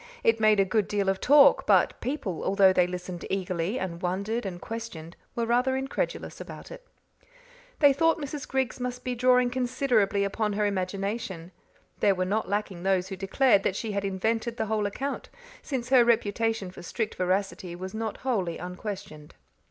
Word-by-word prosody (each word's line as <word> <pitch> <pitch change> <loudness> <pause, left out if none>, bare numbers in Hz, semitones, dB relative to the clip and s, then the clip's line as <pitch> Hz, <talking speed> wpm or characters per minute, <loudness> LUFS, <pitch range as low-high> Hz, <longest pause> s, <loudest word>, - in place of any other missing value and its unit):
It 225 0 +3
made 215 -1 +4
a 195 - +5
good 200 +1 +1
deal 200 -2 0
of 195 0 -1
talk, 285 +1 +6
but - - +3
people, 250 - -3
although 195 -1 +4
they 180 -1 +3
listened 180 -1 -6
eagerly, 185 +2 -1
and 175 -4 -4
wondered 200 +5 -2
and 175 -2 -6
questioned, 190 -7 -7 0.2
were 235 - 0
rather 250 +3 +2
incredulous 270 - -3
about - - -9
it. - - -11 0.9
They 285 -2 +6
thought 325 +4 +3
Mrs. 290 -2 -6
Griggs 265 -1 -1
must 250 0 -4
be 250 - -2
drawing 250 0 +3
considerably 245 -5 +1
upon 210 +1 -1
her 210 +1 0
imagination; 195 -1 -3 0.5
there 200 -2 +3
were 185 0 0
not 210 +3 -1
lacking 200 -3 -2
those 190 0 +1
who 195 - -4
declared 195 +3 +3
that 190 - -1
she 220 +1 -3
had 200 -1 -2
invented 225 +5 -1
the - - -1
whole 215 -1 0
account, 275 +7 -4 0.3
since 255 -4 -4
her 255 -2 +7
reputation 225 -3 +1
for - - -11
strict 215 +5 -3
veracity 185 -1 -1
was 185 +2 -7
not 220 -1 -3
wholly 190 -10 0
unquestioned. 180 -4 -7
210 Hz, 175 wpm, -27 LUFS, 190-245 Hz, 0.9 s, her